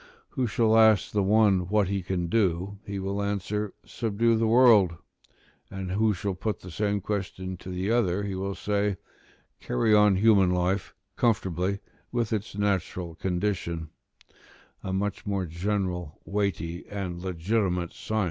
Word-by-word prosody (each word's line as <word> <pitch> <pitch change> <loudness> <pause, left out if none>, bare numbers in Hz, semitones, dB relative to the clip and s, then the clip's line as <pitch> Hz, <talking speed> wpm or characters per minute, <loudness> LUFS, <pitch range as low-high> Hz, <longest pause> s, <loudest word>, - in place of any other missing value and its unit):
Who 130 -2 -1
shall 110 +1 +3
ask 110 -3 +5
the 105 - +1
one 100 -3 +3
what 105 -2 +2
he 100 0 -1
can 90 -1 -2
do, 95 0 0
he 100 0 -4
will 100 +1 -2
answer, 100 +1 -2
"Subdue 115 +1 +1
the 110 0 +1
world": 110 -7 +6 0.7
and 95 -1 -5
who 110 +3 +2
shall 100 +2 -2
put 105 +2 -3
the 90 - -9
same 100 +2 -1
question 95 -2 -4
to 90 - -10
the 95 +3 -2
other, 100 -5 +1
he 100 -1 -3
will 95 +1 -3
say, 100 -1 0 0.6
"Carry 105 - +1
on 105 -2 +6
human 100 -2 +5
life 90 +2 0 0.2
conformably 100 -3 0 0.3
with 120 -2 -1
its 105 -1 -3
natural 95 -4 -1
condition"; 90 -3 -2 0.9
a 95 - -3
much 100 +2 -2
more 100 -2 -1
general, 90 -1 -3
weighty, 90 -4 -2
and 90 -4 -4
legitimate 90 0 -1
science - - -12
than 110 - -1
the - - +2
other. - - +3
100 Hz, 155 wpm, -27 LUFS, 90-105 Hz, 0.9 s, world